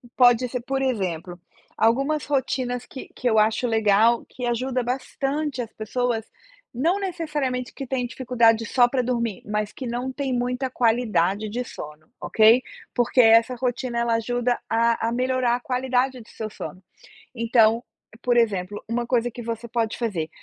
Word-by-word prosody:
Pode 245 Hz, 0 st, +5 dB
ser. 250 Hz, 0 st, -4 dB
Por 270 Hz, +2 st, -2 dB
exemplo, 185 Hz, -8 st, -2 dB, 0.4 s
algumas 275 Hz, +6 st, +2 dB
rotinas 255 Hz, -3 st, -1 dB
que 265 Hz, -, -10 dB
que 250 Hz, -, 0 dB
eu 220 Hz, -, +2 dB
acho 220 Hz, +3 st, +2 dB
legal, 220 Hz, +1 st, +3 dB
que 250 Hz, -, -7 dB
ajuda 250 Hz, +1 st, -1 dB
bastante 270 Hz, +2 st, -2 dB
as 230 Hz, -, -7 dB
pessoas, 225 Hz, 0 st, -2 dB, 0.5 s
não 330 Hz, +11 st, +1 dB
necessariamente 300 Hz, -9 st, -3 dB
que 270 Hz, -, -7 dB
têm 250 Hz, -1 st, -1 dB
dificuldade 235 Hz, -2 st, +2 dB
só 245 Hz, +2 st, +4 dB
pra 255 Hz, +1 st, 0 dB
dormir, 235 Hz, -4 st, -2 dB
mas 210 Hz, 0 st, -2 dB
que 260 Hz, -, -7 dB
não 245 Hz, +2 st, -3 dB
têm 270 Hz, -1 st, -3 dB
muita 250 Hz, +2 st, -1 dB
qualidade 215 Hz, -5 st, +1 dB
de 240 Hz, +4 st, -3 dB
sono, 150 Hz, -6 st, -10 dB
ok? 225 Hz, +3 st, +5 dB, 0.3 s
Porque 245 Hz, +1 st, +1 dB
essa 230 Hz, +2 st, +5 dB
rotina, 245 Hz, 0 st, -2 dB
ela 235 Hz, 0 st, +1 dB
ajuda 245 Hz, +2 st, 0 dB
a 230 Hz, 0 st, +2 dB
a -, -, -3 dB
melhorar 250 Hz, 0 st, +1 dB
a -, -, -3 dB
qualidade 255 Hz, 0 st, 0 dB
do 220 Hz, -, -16 dB
seu 220 Hz, -1 st, -6 dB
sono. 185 Hz, -3 st, -8 dB, 0.5 s
Então, 230 Hz, -1 st, +3 dB, 0.4 s
por 245 Hz, -1 st, +2 dB
exemplo, 205 Hz, -4 st, 0 dB
uma 240 Hz, +1 st, -1 dB
coisa 245 Hz, -1 st, +1 dB
que 240 Hz, -, -8 dB
você 230 Hz, 0 st, -5 dB
pode 230 Hz, -1 st, -1 dB
fazer: 195 Hz, -10 st, -2 dB
240 Hz, 160 wpm, -24 LUFS, 225-255 Hz, 0.5 s, Pode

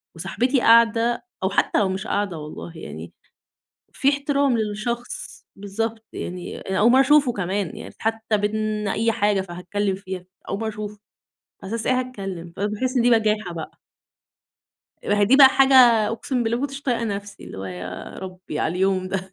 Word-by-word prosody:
وصاحبتي 255 Hz, +1 st, 0 dB
قاعدة 230 Hz, +1 st, +4 dB, 0.2 s
أو 190 Hz, -, +2 dB
حتّى 200 Hz, -, +2 dB
لو 200 Hz, -3 st, +2 dB
مش 190 Hz, 0 st, -4 dB
قاعدة 200 Hz, -5 st, -1 dB
والله، 155 Hz, +2 st, -8 dB
يعني 80 Hz, -, -9 dB, 0.8 s
في 270 Hz, -, +1 dB
احترام 280 Hz, -3 st, +1 dB
للشخص، 225 Hz, +3 st, -4 dB
بالضبط، 220 Hz, +3 st, -4 dB
يعني 180 Hz, 0 st, -6 dB
أنا 190 Hz, 0 st, -3 dB
أول 225 Hz, +3 st, +5 dB
مرّة 260 Hz, -, +6 dB
أشوفه 280 Hz, -1 st, +4 dB
كمان. 195 Hz, -3 st, -2 dB
يعني -, -, -9 dB
حّتى 225 Hz, -1 st, 0 dB
بين 210 Hz, 0 st, -1 dB
أي 225 Hz, +3 st, +1 dB
حاجة 205 Hz, -2 st, +1 dB
فهاتكلّم 190 Hz, +2 st, -3 dB
فيها، 190 Hz, -1 st, -7 dB, 0.2 s
أول 195 Hz, -, -2 dB
مرّة 225 Hz, -, -2 dB
أشوفه، 210 Hz, -1 st, -6 dB, 0.6 s
على 195 Hz, +4 st, -5 dB
أساس 230 Hz, -, -3 dB
إيه 255 Hz, 0 st, +3 dB
هاتكلّم؟ 195 Hz, -9 st, -6 dB
فباحِس 210 Hz, +6 st, -2 dB
إن 245 Hz, -, +4 dB
دي 245 Hz, -, +4 dB
بجاحة 215 Hz, -5 st, +2 dB
بقى. 160 Hz, -2 st, -8 dB, 1.2 s
أهي 205 Hz, 0 st, +2 dB
دي 245 Hz, +7 st, +5 dB
بقى 275 Hz, -2 st, +10 dB
حاجة 270 Hz, 0 st, +4 dB, 0.3 s
أقسم 240 Hz, +3 st, -2 dB
بالله 230 Hz, 0 st, 0 dB
ما -, -, -4 dB
كنتش 275 Hz, 0 st, -9 dB
طايقة 240 Hz, -4 st, 0 dB
نفسي، 205 Hz, -1 st, -5 dB
اللي -, -, -9 dB
هو 95 Hz, -, -5 dB
يا 90 Hz, 0 st, -6 dB
ربّي 185 Hz, -4 st, -7 dB
على 165 Hz, -, 0 dB
اليوم 185 Hz, 0 st, +1 dB
ده، 190 Hz, 0 st, -4 dB
210 Hz, 170 wpm, -23 LUFS, 190-235 Hz, 1.2 s, بقى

